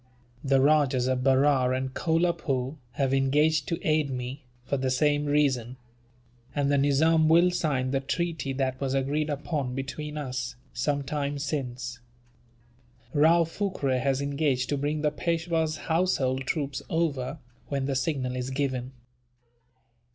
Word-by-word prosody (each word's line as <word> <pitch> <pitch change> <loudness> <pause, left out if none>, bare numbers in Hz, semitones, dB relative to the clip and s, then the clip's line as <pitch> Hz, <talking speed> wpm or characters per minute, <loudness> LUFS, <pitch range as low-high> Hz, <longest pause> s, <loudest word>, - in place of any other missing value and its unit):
The 135 -1 +3
Rajahs 140 -3 +3
of 130 -1 0
Berar 135 -1 +3
and 130 0 -2
Kolapoore 160 -5 0 0.2
have 135 +1 0
engaged 150 +3 +2
to 170 - -1
aid 155 -2 +2
me, 130 +2 -5 0.2
for 140 - -1
the 130 -1 0
same 145 +2 +2
reason; 130 -4 +1 0.8
and 145 -1 +1
the 140 - +3
Nizam 155 +3 +4
will 170 +2 +5
sign 135 -7 0
the 135 - +1
treaty 160 0 -2
that 130 -1 -2
was 135 -1 0
agreed 145 +3 0
upon 145 -3 -2
between 150 +3 -5
us, 130 -3 -4 0.2
some 145 -1 0
time 145 0 -2
since. 125 -4 -4 1.1
Rao 160 +3 +5
Phurkay 165 -7 -1
has 135 +1 0
engaged 140 -3 0
to 145 - 0
bring 150 +2 -1
the 150 - +2
Peishwa's 165 0 -1
household 135 -7 +1
troops 140 -3 -2
over, 150 -5 -1 0.3
when 140 -2 -2
the 135 0 -1
signal 130 -2 -1
is 125 0 -3
given. 130 -2 -2
140 Hz, 140 wpm, -27 LUFS, 130-155 Hz, 1.1 s, will